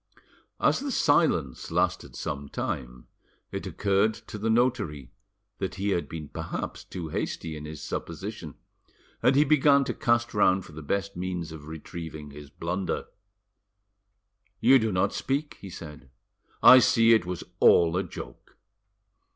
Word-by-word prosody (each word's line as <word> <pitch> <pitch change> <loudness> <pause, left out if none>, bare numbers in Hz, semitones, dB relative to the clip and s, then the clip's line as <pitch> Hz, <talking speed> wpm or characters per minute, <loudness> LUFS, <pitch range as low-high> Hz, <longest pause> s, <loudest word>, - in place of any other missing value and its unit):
As - - +3
the 280 - -4
silence 145 - +2
lasted - - -1
some 70 0 -5
time, - - -4 0.5
it - - -5
occurred 100 +2 +1
to 105 - -9
the 110 +2 -1
notary 110 - 0 0.5
that 95 - -3
he 100 +1 -2
had 90 -3 -1
been 80 -2 -6
perhaps - - -5
too 85 -3 -7
hasty 80 +1 -3
in 75 0 -8
his 75 -1 -8
supposition, 85 0 -6 0.7
and 130 - +4
he 145 - +6
began 140 -1 +4
to 140 - -3
cast 120 -2 +1
round 95 -3 +3
for - - -13
the 80 +1 -9
best 100 +6 -2
means 90 -2 -4
of 80 -2 -10
retrieving 80 -1 -8
his 75 0 -11
blunder. 90 +5 -3 1.5
"You 135 +5 +6
do 110 -1 0
not 95 +2 +1
speak," 140 +3 -2
he 100 - -8
said; 75 -6 -10 0.5
"I 130 - +10
see 115 -2 +5
it 110 -6 +2
was 90 -1 -4 0.2
all 85 0 +5
a 95 - +2
joke." 90 - -10
95 Hz, 150 wpm, -27 LUFS, 80-115 Hz, 1.5 s, I